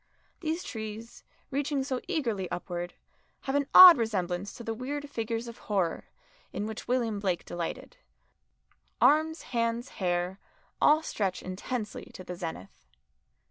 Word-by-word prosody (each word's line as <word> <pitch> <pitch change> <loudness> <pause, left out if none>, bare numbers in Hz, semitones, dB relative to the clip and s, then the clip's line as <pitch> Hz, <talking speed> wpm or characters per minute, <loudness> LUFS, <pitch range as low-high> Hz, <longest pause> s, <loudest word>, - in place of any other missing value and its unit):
These 325 +1 -2
trees, 220 +1 -7 0.3
reaching 280 0 0
so 260 -2 -2
eagerly 225 - -1
upward, 175 0 -5 0.5
have 270 - -3
an 285 -1 +1
odd 365 -6 +11
resemblance 195 -4 -1
to 235 - -9
the 225 - -2
weird 285 +5 -4
figures 230 -1 -3
of 235 - -9
horror 190 -5 0 0.4
in 205 - -3
which 220 0 -6
William 235 -4 0
Blake 185 -4 -1
delighted 175 - -5 1.0
arms, 315 +2 +3
hands, 235 +1 0
hair, 180 +1 0 0.4
all 310 +2 +5
stretch 195 -10 -2
intensely 210 +4 -4
to 185 - -8
the 180 - -6
zenith. 160 - -8
225 Hz, 135 wpm, -29 LUFS, 185-270 Hz, 1.0 s, odd